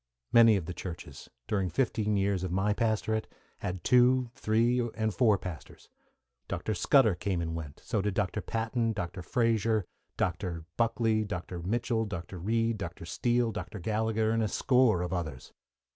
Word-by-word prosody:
Many 115 -2 +8
of 95 -5 -2
the 90 - -5
churches, 85 -6 -8 0.2
during 95 -3 0
fifteen 105 +1 0
years 100 -2 +1
of 95 - -3
my 95 +3 +1
pastorate, 110 -1 0 0.3
had 90 0 -4
two, 125 0 +4
three, 115 +3 +2 0.2
and 110 -2 0
four 110 -4 +4
pastors. 90 -5 -9 0.6
Dr. 95 +3 -2
Scudder 110 +2 +4
came 90 +1 -2
and 80 -1 -2
went; 80 -3 -6
so 110 -3 0
did 100 -1 -1
Dr. 105 +1 -1
Patten, 115 +1 -1
Dr. 90 -3 -4
Frazer, 115 -1 +1 0.3
Dr. 85 -2 -2
Buckley, 115 -1 +1
Dr. 90 -3 -5
Mitchell, 115 +4 0
Dr. 90 -2 -6
Reid, 115 +3 0
Dr. 85 -3 -6
Steele, 120 +7 +1
Dr. 105 0 -6
Gallagher, 110 +3 0
and 115 0 +1
a 110 - +1
score 125 -5 +3
of 90 - -3
others. 80 -8 -5
105 Hz, 160 wpm, -30 LUFS, 90-115 Hz, 0.6 s, Many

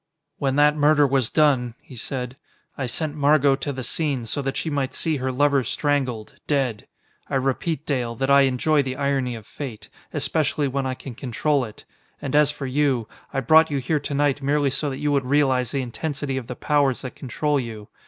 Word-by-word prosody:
"When 135 -1 0
that 150 +1 +5
murder 150 0 +4
was 135 -4 +1
done," 130 -6 +2
he 130 - -14
said, 125 +1 -4 0.4
"I 135 -3 -3
sent 150 +5 -2
Margot 145 -1 +4
to 145 +1 -3
the 130 -1 -5
scene, 140 -4 -1
so 130 +5 -2
that 135 0 -3
she - - -3
might 140 -2 -1
see 160 -3 0
her 130 0 -2
lover 140 +1 +3
strangled, 130 -3 -1
dead. 135 -7 0 0.4
I - - -1
repeat, 135 +4 -1
Dale, 125 -5 -1
that 135 +3 0
I 140 0 +7
enjoy 145 +4 +2
the 130 -1 -3
irony 135 -3 0
of 110 -2 -10
fate, 125 -5 -8 0.2
especially 150 -1 0
when 135 0 -1
I 130 - -2
can 130 0 -9
control 135 +4 0
it. 110 - -12 0.3
And 135 - -3
as 150 -1 +5
for 150 -2 -5
you 130 -4 +1 0.2
I 135 - -1
brought 155 +6 +6
you 145 - -1
here 140 +4 0
to 145 - -5
night 145 0 +1
merely 140 0 +1
so 145 +2 -1
that 135 - -4
you 145 +1 0
would 140 -2 +1
realize 130 -3 +2
the 135 +1 -1
intensity 135 +2 -3
of 130 -3 -4
the 125 - -5
powers 140 -3 +1
that 130 - -5
control 145 +2 -1
you. 110 -4 -6
135 Hz, 205 wpm, -23 LUFS, 130-145 Hz, 0.4 s, I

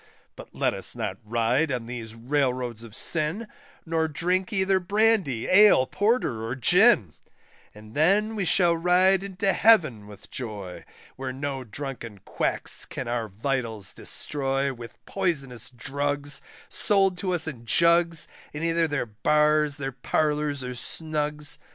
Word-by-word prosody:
But - - -13
let - - +1
us - - +1
not - - -4
ride 120 +7 0
on 125 -3 -3
these 115 -2 -7
Railroads 125 -2 -1
of 110 -2 -9
sin, 170 +8 -1 0.4
Nor 160 -1 0
drink 180 +4 -1
either 190 -2 +2
Brandy, 195 - +1
Ale, 205 -8 +6
Porter, 205 - 0
or 115 +3 -3
Gin; 175 - +4 0.6
And 105 +1 -14
then 200 - +2
we 200 - -1
shall 175 -1 +4
ride 180 +3 +3
into 195 0 -1
Heaven 155 - +3
with 105 -2 -14
joy, 105 -7 -6 0.3
Where 130 0 -4
no 135 0 -4
drunken 120 -2 -7
quacks - - 0
can - - -6
our 120 -2 -2
vitals 110 -1 -2
destroy 135 -1 -2
With 120 -2 -11
poisonous 140 - -2
drugs, 145 +3 -2 0.3
sold 195 -3 +2
to 185 -1 -1
us 160 -2 0
in 120 -7 -7
jugs, 170 +2 +3 0.3
In 150 +2 -5
either 165 0 +1
their 145 -4 -2
Bars, 150 +6 +1
their 135 -1 -4
Parlours, 150 +1 -1
or 125 0 -5
Snugs. 150 +2 -3
145 Hz, 140 wpm, -25 LUFS, 120-175 Hz, 0.6 s, Ale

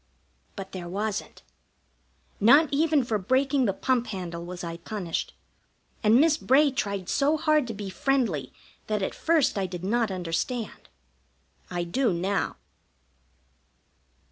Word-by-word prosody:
But 195 -1 -7
there 175 -2 -6
wasn't. 210 +3 -4 1.0
Not 280 +9 +6
even 305 -1 +3
for 225 -3 -1
breaking 265 +6 +2
the 200 - +2
pump 245 +3 0
handle 175 -4 -5
was 175 +1 -7
I 170 -1 -5
punished, 175 -1 -4 0.7
and 220 +3 +5
Miss 310 0 +4
Bray 280 +1 +4
tried 200 -8 -3
so 290 +2 +2
hard 305 -4 +2
to 225 - -5
be 200 -1 -6
friendly 215 - 0 0.4
that 210 -2 -1
at - - -2
first 320 -10 +2
I 190 - -1
did 180 -1 -7
not 225 +3 +1
understand. 190 +6 -3 0.8
I 175 -1 -2
do 235 +8 +1
now. 195 +4 -1
215 Hz, 135 wpm, -26 LUFS, 185-270 Hz, 1.0 s, Not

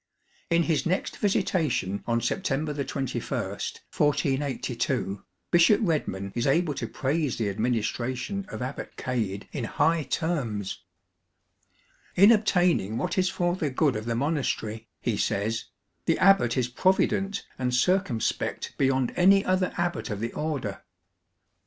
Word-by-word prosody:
In 170 0 +3
his 155 -4 +1
next 180 +3 -1
visitation 150 - 0
on 115 0 +1
September 150 - -1
21, 140 -2 -3 0.2
1482, 130 -7 -1 0.3
Bishop 175 +5 +6
Redman 100 - -1
is 120 +1 -1
able 155 +2 +2
to 120 - -4
praise 140 +3 -1
the 110 -3 0
administration 125 - -2
of 125 - -5
Abbot 130 +2 -6
Cade 110 -6 -2
in 130 -5 -3
high 165 +7 +2
terms. 130 - -2 0.7
" - - -36
In 200 +5 +8
obtaining 180 - +2
what 180 +4 -1
is 185 0 +2
for 175 -1 0
the 155 -5 -1
good 140 +1 +1
of 105 +1 -4
the 115 0 -1
monastery," 115 -5 -1
he 115 -4 -1
says, 110 +4 -1 0.2
" 100 - -48
the 165 - +3
abbot 185 -11 +4
is 125 -2 +2
provident 190 +7 +1
and 125 -1 0
circumspect 130 - 0
beyond 130 -2 +2
any 195 +2 +5
other 185 0 +1
abbot 175 -5 -1
of 105 -2 -3
the 115 +2 -3
Order." 140 -10 -3
135 Hz, 135 wpm, -27 LUFS, 115-175 Hz, 0.7 s, In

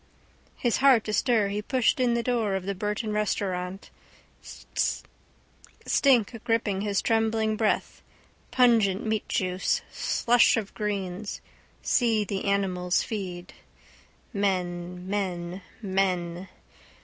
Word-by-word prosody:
His 240 -2 +1
heart 260 -5 +5
astir 215 -1 +2
he 205 +1 -2
pushed 255 +3 +1
in 245 -2 +2
the 235 - 0
door 230 -5 0
of 190 -1 -3
the 200 - -1
Burton 210 +2 -3
restaurant. 190 -2 -2 1.9
Stink 240 -4 +2
gripped 230 0 +1
his 200 0 -1
trembling 220 -1 +1
breath: 215 0 -1 0.5
pungent 225 -6 +3
meatjuice, 190 -4 0
slush 240 -1 +3
of 210 -3 -4
greens. 200 -1 -3 0.4
See 225 -4 +2
the 200 -1 -4
animals 185 -3 +1
feed. 185 -4 -6 0.8
Men, 180 -3 -2
men, 185 -2 -3 0.2
men. 185 -2 -1
205 Hz, 100 wpm, -27 LUFS, 185-225 Hz, 1.9 s, heart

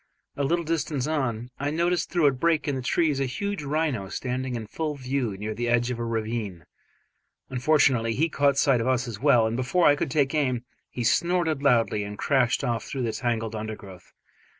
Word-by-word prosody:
A 140 - -1
little 170 +4 0
distance 150 -4 -1
on, 130 -6 -2
I 140 +1 -1
noticed 170 +2 0
through 175 -4 +2
a 140 - +6
break 160 +5 +1
in 145 - +1
the 130 - -3
trees 150 +2 +1
a 135 - 0
huge 200 +8 -3
rhino 145 -9 -1
standing 130 +2 -3
in 115 -2 -4
full 150 +7 -3
view 130 -6 -2
near 105 +2 -4
the 120 +2 -2
edge 120 +1 +2
of 120 - -4
a - - -2
ravine. 110 -5 -3 0.9
Unfortunately 125 -4 +2
he 160 +4 +2
caught 140 -3 +2
sight 135 -4 +3
of 115 - -1
us 130 -1 +1
as 110 -3 -6
well, 125 -5 +4
and 110 +1 -1
before 130 +8 +1
I 145 - +6
could 145 - -2
take 140 0 +1
aim, 130 -5 0 0.2
he 120 - -4
snorted 170 +3 +1
loudly 115 -6 +2
and 105 0 -7
crashed 130 -4 +1
off 115 -1 -1
through 135 -2 -4
the 115 - 0
tangled 115 -1 -2
undergrowth. 105 -4 -8
130 Hz, 200 wpm, -26 LUFS, 115-150 Hz, 0.9 s, a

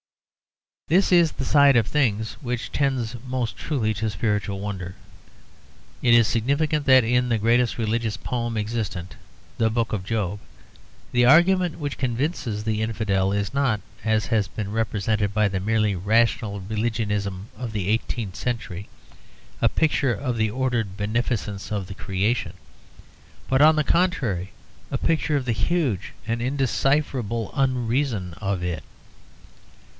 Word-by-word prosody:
This 185 +6 +3
is 170 -3 +5
the 135 - -4
side 140 -1 +5
of 115 - +3
things 110 -7 0
which 125 -3 -3
tends 130 -4 0
most 125 -2 -2
truly 115 -8 -1
to 110 +2 -2
spiritual 105 -2 -1
wonder. 95 -3 -5 1.1
It 120 - +4
is 115 -2 +6
significant 145 +5 0
that 130 -3 +7
in 125 +1 +2
the 115 - +2
greatest 115 +2 +2
religious 115 -1 -1
poem 120 -2 -3
existent, 105 -5 -3 0.4
the 115 -1 +3
Book 115 0 -1
of 100 -4 -2
Job, 105 -1 -2 0.7
the 120 0 +4
argument 175 +5 +5
which 145 -3 -4
convinces 120 -4 -2
the 110 -1 -1
infidel 105 -4 0
is 100 +2 -1
not 135 -6 +1 0.2
(as 110 0 +1
has 110 -4 +1
been 100 +2 -5
represented 105 -2 0
by 105 -1 +4
the 95 -1 -2
merely 105 0 +1
rational 105 +1 +1
religionism 105 -2 -2
of 125 -3 -5
the 100 -4 -3
eighteenth 110 -2 -1
century) 110 -6 -4 0.7
a - - +4
picture 145 -5 +1
of 125 -4 -2
the 110 -1 +1
ordered 115 -5 -1
beneficence 105 -2 -2
of 100 -3 -2
the 95 - -7
Creation; 105 +3 -1 0.9
but, 130 +1 +2
on 155 +1 +7
the 155 - +3
contrary, 125 - +1 0.4
a 135 - -1
picture 155 0 +1
of 135 - -3
the 120 - 0
huge 130 - 0 0.2
and 115 +1 -1
undecipherable 130 -3 0
unreason 125 - 0
of 100 -3 -1
it. 85 -4 -3
115 Hz, 140 wpm, -24 LUFS, 105-130 Hz, 1.1 s, that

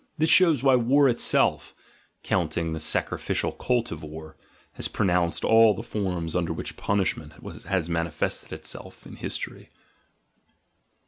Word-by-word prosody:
This 160 +1 +2
shows 165 -8 +5
why 135 -2 +5
war 135 +4 +4
itself 120 -2 +1 0.5
(counting 85 -2 -1
the 80 - -4
sacrificial 80 - -1
cult 125 -2 -1
of 80 -1 -6
war) 80 0 -9 0.4
has - - -3
produced 90 -2 0
all 115 -2 +6
the 115 - -6
forms 90 -8 -3
under 85 -2 0
which - - -6
punishment 100 -1 -1 0.3
has 95 -4 -1
manifested 85 -2 -2
itself - - -8
in - - -11
history. - - -6
95 Hz, 130 wpm, -26 LUFS, 85-120 Hz, 0.5 s, all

